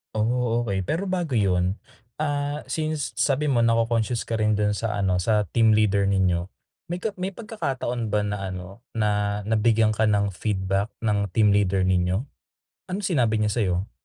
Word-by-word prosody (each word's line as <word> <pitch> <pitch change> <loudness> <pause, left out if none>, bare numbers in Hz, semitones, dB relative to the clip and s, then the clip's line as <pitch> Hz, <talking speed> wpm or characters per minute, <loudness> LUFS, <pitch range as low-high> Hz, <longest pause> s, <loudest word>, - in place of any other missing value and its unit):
Oh, 120 +1 0
okey, 95 -1 -1
pero 170 - -2
bago 170 -10 0
yun, 90 0 +1 0.4
ah, 145 -1 -2
since 155 -7 -2
sabi 145 +2 +1
mo 120 -5 +3
na-coconscious 115 0 +1
ka 115 - -1
rin 105 -1 +1
dun 105 0 +1
sa 105 -1 -2
ano, 95 -2 +1
sa 105 -1 +2
team 115 -1 +5
leader 105 -2 +3
ninyo, 95 -2 +1 0.4
may 175 - -2
ka 210 0 -3
may 185 +1 -3
pagkakataon 135 - -3
ba 105 - +2
na 100 -2 -3
ano, 95 +5 -9
na, 105 -2 0
nabigyan 110 0 +3
ka 110 - +1
ng 105 -1 +2
feedback 100 +1 -1
ng 100 -4 0
team 105 -1 +4
leader 95 -2 +2
ninyo? 95 +7 +1 0.6
Anong 190 +3 -4
sinabi 120 - +1
niya 105 - +1
sayo? 95 -4 -1
110 Hz, 165 wpm, -24 LUFS, 100-125 Hz, 0.6 s, team